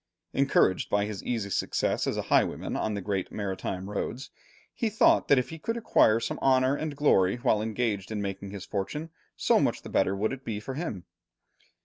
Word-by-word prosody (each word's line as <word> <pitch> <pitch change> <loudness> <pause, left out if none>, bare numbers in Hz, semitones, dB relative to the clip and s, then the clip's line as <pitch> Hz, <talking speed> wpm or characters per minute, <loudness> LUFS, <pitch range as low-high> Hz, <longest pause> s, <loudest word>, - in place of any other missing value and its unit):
Encouraged 135 -9 +2
by 100 0 +2
his 105 -2 -6
easy 110 -5 -2
success - - 0
as - - -1
a - - -1
highwayman - - +1
on 110 -1 -1
the 100 - -3
great 95 -1 -2
maritime 95 -2 -4
roads, 120 +6 -4 0.4
he 230 - -1
thought 215 - +4
that 140 - +5
if 125 - 0
he 160 - -8
could 230 +9 -2
acquire 115 - +4
some 115 - -3
honour 130 0 +3
and 155 -1 -4
glory 95 -10 +4
while 120 -4 +1
engaged 110 -3 -2
in 110 - -2
making 100 0 -4
his 100 -1 -7
fortune, 150 +12 -4 0.3
so - - +3
much - - 0
the - - -8
better 95 - +2
would 110 +5 -1
it 135 -1 -8
be 110 -4 -3
for 130 +5 -6
him. 120 - -5
110 Hz, 200 wpm, -28 LUFS, 100-135 Hz, 0.4 s, that